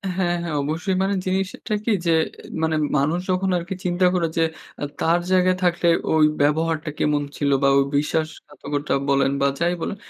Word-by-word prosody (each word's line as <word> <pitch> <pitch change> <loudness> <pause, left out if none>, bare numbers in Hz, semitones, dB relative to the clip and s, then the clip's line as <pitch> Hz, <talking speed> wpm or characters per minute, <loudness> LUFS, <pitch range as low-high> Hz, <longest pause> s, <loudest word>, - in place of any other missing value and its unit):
হ্যাঁ, 175 -2 0
হ্যাঁ 165 -3 -3
অবশ্যই 165 +6 -2
মানে 195 +1 0
জিনিসটা 190 +3 -2
কি 230 - +1
যে 170 - +3 0.5
মানে 160 0 +1 0.2
মানুষ 155 +5 +1
যখন 185 +1 0
আরকি 175 +3 -5
চিন্তা 180 +1 +2
করে 175 -2 +1
যে 165 - +4 0.4
আ - - -2 0.2
তার 165 +2 +3
জায়গায় 185 0 +4
থাকলে 175 0 +2 0.3
ওই 155 -1 +5 0.2
ব্যবহারটা 155 +1 +1
কেমন 150 -1 +1 0.2
ছিল 145 - 0
বা - - +5
ওই 140 - +5
বিশ্বাসঘাতকতা 150 -1 -3 0.2
বলেন 140 0 +3
বা 140 - +4
যাই 170 +1 +1
বলেন 200 - -3
165 Hz, 170 wpm, -22 LUFS, 150-180 Hz, 0.5 s, ওই